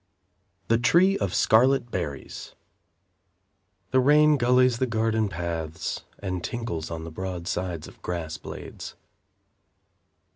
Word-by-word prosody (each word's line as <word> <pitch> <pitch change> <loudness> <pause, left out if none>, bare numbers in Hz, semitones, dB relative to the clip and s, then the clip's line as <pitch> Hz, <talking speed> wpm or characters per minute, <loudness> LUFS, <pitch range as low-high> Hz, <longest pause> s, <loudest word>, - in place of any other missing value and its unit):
The 115 0 +3
Tree 175 +10 +4
of 95 - -1
Scarlet 120 +4 +3
Berries 70 -7 -5 1.4
The 130 - +4
rain 150 +3 +5
gullies 125 -1 +3
the 130 - +1
garden 110 -2 0
paths 85 -2 -4
And 90 -3 -4
tinkles 115 -10 -4
on 80 -1 -5
the 80 - -7
broad 90 0 -5
sides 90 -4 -3
of - - -16
grass 85 -3 -4
blades. - - -8
105 Hz, 115 wpm, -26 LUFS, 85-125 Hz, 1.4 s, rain